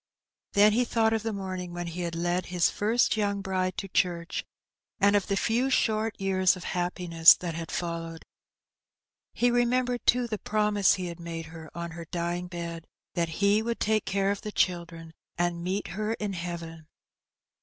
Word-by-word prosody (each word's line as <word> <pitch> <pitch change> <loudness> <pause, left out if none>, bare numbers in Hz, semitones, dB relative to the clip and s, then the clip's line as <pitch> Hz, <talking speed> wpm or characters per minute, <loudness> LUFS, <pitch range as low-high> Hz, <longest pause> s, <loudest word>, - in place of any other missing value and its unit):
Then 205 +1 +6
he 245 +3 +3
thought 225 -2 +2
of 220 - 0
the 225 +1 -2
morning 185 -3 -5
when 175 0 -4
he 170 +1 -5
had 170 -1 -3
led 175 +2 -1
his 180 -1 +2
first 225 +4 +2
46 - - -1
Hee 220 - 0
Benny. 205 - +2
young 200 0 -3
bride 185 -1 -1
to 195 - -4
church, 175 -2 -1 0.6
and 200 +1 +4
of 200 - +1
the 200 - 0
few 240 +6 +1
short 220 -3 +1
years 190 -1 +3
of 180 - -9
happi 180 0 -3
ness 165 -1 +8
that 175 -2 -5
had 165 0 -5
followed. 165 -1 -4 1.1
He 245 0 +3
remembered, 245 0 +1
too, 245 0 +4
the 215 -3 -4
promise 210 -2 +2
he 185 -2 -4
had 170 -1 -6
made 165 -1 -6
her 160 -1 -10
on 170 0 -4
her 165 0 -8
dying 175 +1 -3
bed 170 -2 -6
— - - -65
that 170 -1 0
he 205 +2 +4
would 235 +1 -2
take 215 0 +1
care 195 0 +1
of 200 - -3
the 210 - -5
children, 170 -4 -1 0.2
and 175 0 -1
meet 190 +3 -2
her 215 +5 -2
in 210 -3 -3
heaven. 170 -2 -6
185 Hz, 195 wpm, -28 LUFS, 170-210 Hz, 1.1 s, ness